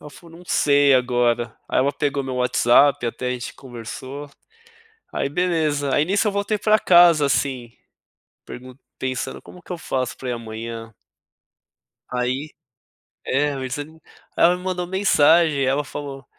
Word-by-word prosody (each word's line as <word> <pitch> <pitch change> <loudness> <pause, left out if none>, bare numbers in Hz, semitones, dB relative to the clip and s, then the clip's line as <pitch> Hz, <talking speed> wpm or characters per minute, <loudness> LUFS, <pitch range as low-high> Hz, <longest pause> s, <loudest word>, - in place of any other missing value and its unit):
ela 150 - -11
falou: 165 +3 -15
"Não 180 - -15
sei 145 -4 +4
agora." 120 -2 +1
Aí - - 0
ela 140 +2 +2
pegou 140 -2 -2
meu 130 -1 -4
WhatsApp 125 +2 +3
até 125 +2 -3
a - - -1
gente 125 -1 -6
conversou, 130 +3 -9 0.8
aí 140 - -2
beleza. 155 -4 0
Aí 145 - +3
nisso, 200 +4 +1
eu - - +1
voltei 200 +1 -1
para 215 +1 +3
casa, 170 -4 +6
assim, 130 -4 -1 0.7
pergun 130 +1 -10 0.2
pensando: 130 0 -4
"Como 180 - -14
que 180 - -8
eu 175 - -5
faço 130 -5 -3
para 130 - -5
ir - - -1
amanhã?" 115 -1 -7 1.1
Aí, 130 +4 -2 0.8
é, 145 +2 0
meio 130 -1 -4
desa 145 +3 -4 0.5
ela 175 +1 +4
me 180 - -10
mandou 180 -1 -2
mensagem, 165 -5 +3
ela 140 +3 +1
falou: 135 -1 -8
140 Hz, 155 wpm, -22 LUFS, 125-165 Hz, 1.1 s, casa